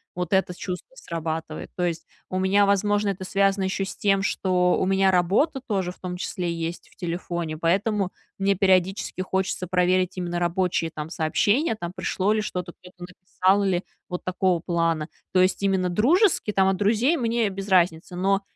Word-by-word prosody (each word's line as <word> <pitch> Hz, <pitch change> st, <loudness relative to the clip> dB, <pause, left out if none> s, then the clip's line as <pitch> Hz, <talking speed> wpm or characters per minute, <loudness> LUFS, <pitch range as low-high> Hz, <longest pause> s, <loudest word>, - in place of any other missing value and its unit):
Вот 180 Hz, 0 st, -3 dB
это 190 Hz, -1 st, +2 dB
чувство 185 Hz, -, -6 dB
срабатывает. 160 Hz, -, -5 dB
То 180 Hz, -, -2 dB
есть 165 Hz, -1 st, -3 dB, 0.2 s
у 185 Hz, -, -2 dB
меня, 195 Hz, +2 st, +4 dB
возможно, 205 Hz, +1 st, +2 dB
это 190 Hz, -1 st, -4 dB
связано 195 Hz, 0 st, +1 dB
еще 195 Hz, +1 st, -1 dB
с -, -, -7 dB
тем, 195 Hz, -1 st, +2 dB
что 180 Hz, -2 st, +1 dB
у -, -, +2 dB
меня 195 Hz, 0 st, +3 dB
работа 200 Hz, -, +2 dB
тоже 190 Hz, -4 st, -1 dB
в -, -, -17 dB
том 180 Hz, -1 st, -5 dB
числе 180 Hz, -1 st, -3 dB
есть 165 Hz, +1 st, -5 dB
в -, -, -24 dB
телефоне, 170 Hz, -2 st, -4 dB
поэтому 190 Hz, +4 st, 0 dB, 0.3 s
мне 195 Hz, 0 st, +2 dB
периодически 190 Hz, 0 st, +1 dB
хочется 185 Hz, -1 st, -2 dB
проверить 185 Hz, 0 st, +1 dB
именно 175 Hz, -1 st, -2 dB
рабочие 175 Hz, -1 st, 0 dB
там 155 Hz, +2 st, -6 dB
сообщения: 205 Hz, -, +1 dB
там, 175 Hz, -4 st, -5 dB
пришло 200 Hz, +1 st, 0 dB
ли 215 Hz, -, +1 dB
что-то, 180 Hz, -4 st, -4 dB
кто-то 180 Hz, 0 st, -17 dB
где-то 180 Hz, -, -15 dB
написал 190 Hz, +2 st, +2 dB
или 185 Hz, -2 st, 0 dB, 0.3 s
вот 180 Hz, -1 st, -5 dB
такого 185 Hz, -1 st, +1 dB
плана. 165 Hz, -2 st, 0 dB, 0.3 s
То 185 Hz, -, +5 dB
есть 185 Hz, +1 st, +1 dB
именно 190 Hz, -2 st, +1 dB
дружески, 275 Hz, -, +3 dB
там, 190 Hz, -2 st, +3 dB
от 195 Hz, -, +1 dB
друзей- 225 Hz, -, +2 dB
мне 230 Hz, -3 st, +1 dB
без 195 Hz, +1 st, -6 dB
разницы, 175 Hz, -1 st, +2 dB
но 195 Hz, +2 st, +1 dB
185 Hz, 180 wpm, -24 LUFS, 175-200 Hz, 0.3 s, То